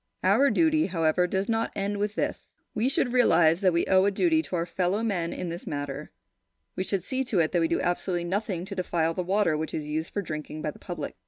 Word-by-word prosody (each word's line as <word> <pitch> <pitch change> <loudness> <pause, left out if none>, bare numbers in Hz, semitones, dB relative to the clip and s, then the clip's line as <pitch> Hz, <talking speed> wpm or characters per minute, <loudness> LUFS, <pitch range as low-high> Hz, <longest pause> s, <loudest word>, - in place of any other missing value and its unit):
Our 280 0 +4
duty, 315 0 +3
however, 170 -1 +1
does 190 +2 -1
not 225 0 0
end 200 +1 -2
with 210 +1 -1
this. - - -3 0.2
We 225 +4 +1
should 250 -2 0
realise 170 -9 +4
that 190 -2 +3
we 170 0 +1
owe 190 0 +4
a - - +4
duty 320 - +2
to 190 - -5
our 170 -1 0
fellowmen 185 0 -1
in 180 - -4
this 170 +1 -7
matter. 145 0 -4 0.7
We 185 - -1
should 190 -1 -1
see 260 +5 -2
to 230 -5 -1
it 160 -2 +2
that 175 - +2
we 165 - +3
do - - 0
absolutely 175 0 -1
nothing 190 -1 -2
to 200 - -7
defile 170 -3 0
the 180 - -2
water 185 -2 +1
which 160 +1 -3
is 150 - -3
used 155 +2 -3
for 205 - -2
drinking 155 -1 -6
by 150 - -1
the - - -17
public. - - -6
185 Hz, 235 wpm, -27 LUFS, 165-210 Hz, 0.7 s, Our